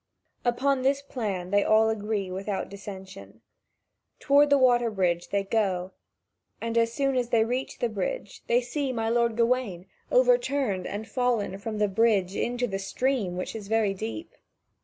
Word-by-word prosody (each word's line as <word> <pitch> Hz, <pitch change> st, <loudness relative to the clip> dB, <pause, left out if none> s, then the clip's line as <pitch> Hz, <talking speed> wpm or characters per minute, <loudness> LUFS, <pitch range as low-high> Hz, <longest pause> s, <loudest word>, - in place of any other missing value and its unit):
Upon 260 Hz, +2 st, +1 dB
this 275 Hz, +2 st, +2 dB
plan 200 Hz, -9 st, -4 dB
they 205 Hz, 0 st, +4 dB
all 220 Hz, +1 st, +4 dB
agree 210 Hz, -3 st, -2 dB
without 195 Hz, +1 st, -3 dB
dissension. 190 Hz, -, -10 dB, 0.8 s
Toward 285 Hz, +2 st, +4 dB
the 285 Hz, -, +5 dB
water 245 Hz, -3 st, +4 dB
bridge 180 Hz, -4 st, 0 dB
they 200 Hz, 0 st, 0 dB
go, 195 Hz, -3 st, 0 dB, 0.7 s
and 230 Hz, 0 st, -3 dB
as 230 Hz, 0 st, +3 dB
soon 275 Hz, +1 st, 0 dB
as 245 Hz, -2 st, 0 dB
they 225 Hz, -2 st, +3 dB
reach 250 Hz, +3 st, -3 dB
the 240 Hz, -, 0 dB
bridge, 205 Hz, -2 st, -4 dB
they 240 Hz, +1 st, +3 dB
see 265 Hz, +3 st, -2 dB
my 225 Hz, -2 st, -1 dB
lord 235 Hz, -1 st, +1 dB
Gawain 230 Hz, -7 st, 0 dB, 0.3 s
overturned 285 Hz, -, +2 dB
and 210 Hz, +2 st, -5 dB
fallen 235 Hz, -7 st, -1 dB
from 215 Hz, +1 st, -4 dB
the 210 Hz, 0 st, +2 dB
bridge 200 Hz, -2 st, +2 dB
into 245 Hz, +1 st, -1 dB
the 195 Hz, -4 st, -3 dB
stream 200 Hz, -2 st, -1 dB
which 185 Hz, -, -4 dB
is 210 Hz, -3 st, -7 dB
very 220 Hz, -2 st, +2 dB
deep. 225 Hz, -, -6 dB
225 Hz, 160 wpm, -27 LUFS, 195-250 Hz, 0.8 s, the